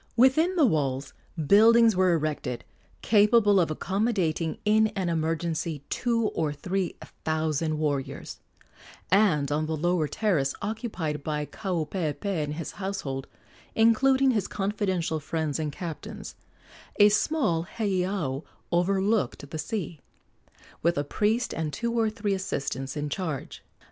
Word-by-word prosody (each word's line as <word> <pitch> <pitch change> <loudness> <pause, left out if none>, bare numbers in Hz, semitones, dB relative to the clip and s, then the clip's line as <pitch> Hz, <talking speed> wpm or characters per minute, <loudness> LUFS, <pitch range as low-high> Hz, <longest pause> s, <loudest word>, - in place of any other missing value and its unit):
Within 310 +9 +4
the 320 -5 +5
walls 140 - 0 0.3
buildings 225 +5 +6
were 185 -1 +4
erected 150 -6 -2 0.4
capable 210 -1 +5
of 170 - +2
accommodating 180 -2 -1
in 215 +1 +4
an 190 -3 -1
emergency 165 -2 -2
two 230 -3 +1
or 155 -3 -1
three 180 +5 -2 0.3
thousand 155 0 0
warriors, 145 -3 -3 0.7
and 175 -8 +3
on 155 +1 0
the 160 0 -2
lower 175 0 +1
terrace, 155 -9 0
occupied 200 - -3
by 150 -1 -2
Kaupeepee 175 0 -2
and 150 0 -4
his 165 0 -5
household, 190 -9 -4 0.5
including 260 +4 +4
his 210 -6 0
confidential 195 -5 -1
friends 155 0 -2
and 155 -2 -2
captains, 205 +7 -7 0.6
a 205 0 +7
small 205 - +1
heiau 185 - -1 0.3
overlooked 190 - +1
the 155 - -4
sea, 175 -4 -4 0.8
with 170 +1 +2
a 145 - +1
priest 215 - 0
and 160 -2 -2
two 235 +8 -2
or 225 -2 +2
three 210 -2 -2
assistants 140 -7 -3
in 150 0 -2
charge. 155 -3 -4
175 Hz, 125 wpm, -27 LUFS, 155-210 Hz, 0.8 s, a